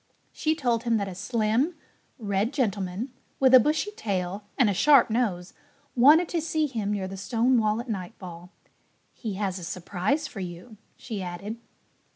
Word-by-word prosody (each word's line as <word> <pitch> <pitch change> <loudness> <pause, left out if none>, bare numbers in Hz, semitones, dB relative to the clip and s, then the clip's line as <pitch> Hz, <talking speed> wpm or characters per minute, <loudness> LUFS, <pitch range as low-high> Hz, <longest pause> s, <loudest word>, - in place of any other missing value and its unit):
She 315 0 0
told 240 -7 0
him 235 -2 +1
that 200 -2 -2
a 190 - -6
slim, 230 - 0 0.4
red 205 -1 -1
gentleman 205 -1 -2 0.3
with 260 -1 +4
a 255 - +11
bushy 310 - +1
tail 195 - -3
and 250 - +4
a 205 - +2
sharp 270 +3 +5
nose 200 -7 -1 0.4
wanted 300 +8 +6
to 335 - -1
see 315 -1 0
him 225 -7 -2
near 195 -2 -2
the 195 +1 -7
stone 235 +5 +1
wall 215 0 +1
at 240 - -6
nightfall. 180 -4 -7 0.6
"He 215 -5 -5
has 195 -2 -2
a - - -9
surprise 185 - -2
for 225 - -9
you," 180 +5 -8 0.2
she 220 -5 -6
added. 185 +5 -5
215 Hz, 170 wpm, -26 LUFS, 190-255 Hz, 0.6 s, a